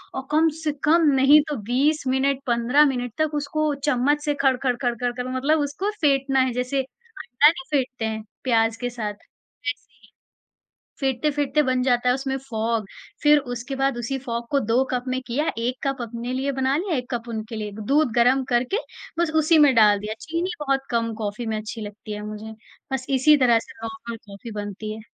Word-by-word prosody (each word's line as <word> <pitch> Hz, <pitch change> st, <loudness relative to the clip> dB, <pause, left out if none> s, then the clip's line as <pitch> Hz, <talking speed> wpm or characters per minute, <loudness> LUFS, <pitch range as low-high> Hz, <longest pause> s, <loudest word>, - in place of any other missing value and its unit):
और 265 Hz, 0 st, -5 dB
कम 320 Hz, +2 st, +4 dB
से 305 Hz, -, +1 dB
कम 320 Hz, +1 st, +4 dB
नहीं 275 Hz, +3 st, +7 dB
तो 295 Hz, -, -1 dB, 0.2 s
20 295 Hz, +4 st, +2 dB
मिनट, 270 Hz, +1 st, +1 dB
15 245 Hz, +5 st, +4 dB
मिनट 245 Hz, -4 st, -1 dB
तक 310 Hz, -1 st, +1 dB
उसको 305 Hz, +1 st, -1 dB, 0.2 s
चम्मच 290 Hz, +4 st, +2 dB
से 295 Hz, -, +1 dB
खड़-खड़, 260 Hz, -2 st, +2 dB
खड़-खड़, 245 Hz, 0 st, 0 dB
खड़, 250 Hz, +1 st, -5 dB
मतलब 300 Hz, +4 st, +2 dB
उसको 290 Hz, +8 st, -2 dB
फेंटना 275 Hz, -2 st, +2 dB
है, 260 Hz, -1 st, +2 dB
जैसे 250 Hz, +2 st, -1 dB
अंडा 295 Hz, -, 0 dB
नहीं 355 Hz, +2 st, -4 dB
फेंटते 255 Hz, -4 st, -1 dB
हैं 220 Hz, 0 st, -3 dB, 0.2 s
प्याज़ 225 Hz, -2 st, +2 dB
के 245 Hz, -, -2 dB
साथ, 220 Hz, -4 st, -4 dB
वैसे 285 Hz, +6 st, -9 dB
ही। -, -, -23 dB, 0.9 s
फेटते-फेटते 285 Hz, +2 st, +1 dB
बन 255 Hz, -1 st, +1 dB
जाता 250 Hz, -1 st, +2 dB
है -, -, +4 dB
उसमें 270 Hz, 0 st, -2 dB
फॉग, 230 Hz, -4 st, -2 dB, 0.4 s
फिर 295 Hz, 0 st, +7 dB, 0.2 s
उसके 245 Hz, +3 st, -5 dB
बाद 270 Hz, -1 st, 0 dB
उसी 240 Hz, +3 st, -2 dB
फ़ॉग 235 Hz, -2 st, -4 dB
को 280 Hz, -, +3 dB
2 235 Hz, +2 st, +2 dB
कप 250 Hz, -1 st, -1 dB
में 255 Hz, 0 st, -1 dB
किया, 290 Hz, +7 st, 0 dB
1 240 Hz, +2 st, -1 dB
कप 270 Hz, -2 st, -2 dB
अपने 235 Hz, +2 st, -5 dB
लिए 270 Hz, +2 st, -1 dB
बना 265 Hz, +1 st, +2 dB
लिया, 355 Hz, -1 st, -1 dB
1 250 Hz, 0 st, -5 dB
कप 240 Hz, 0 st, -3 dB
उनके 220 Hz, 0 st, -5 dB
लिए। 210 Hz, -1 st, -4 dB, 0.2 s
दूध 290 Hz, -3 st, +3 dB
गरम 250 Hz, +3 st, +4 dB
करके 250 Hz, -, +1 dB, 0.4 s
बस 340 Hz, -2 st, +1 dB
उसी 320 Hz, +2 st, +5 dB
में 290 Hz, -3 st, +6 dB
डाल 210 Hz, -2 st, +6 dB
दिया, 210 Hz, +1 st, -4 dB
चीनी 335 Hz, +3 st, -2 dB
बहुत 275 Hz, -2 st, 0 dB
कम 230 Hz, -1 st, 0 dB
कॉफ़ी 210 Hz, +3 st, -3 dB
में 220 Hz, -, -1 dB
अच्छी 220 Hz, +1 st, -6 dB
लगती 210 Hz, 0 st, -7 dB
है 210 Hz, -, -5 dB
मुझे। 215 Hz, +1 st, -7 dB, 0.4 s
बस 260 Hz, -1 st, -2 dB
इसी 275 Hz, +3 st, +5 dB
तरह 240 Hz, -4 st, +4 dB
से -, -, -12 dB
नॉर्मल 225 Hz, +1 st, -6 dB
कॉफ़ी 200 Hz, +3 st, -9 dB
बनती 205 Hz, +1 st, -6 dB
है। 220 Hz, -, -10 dB
255 Hz, 195 wpm, -23 LUFS, 235-285 Hz, 0.9 s, नहीं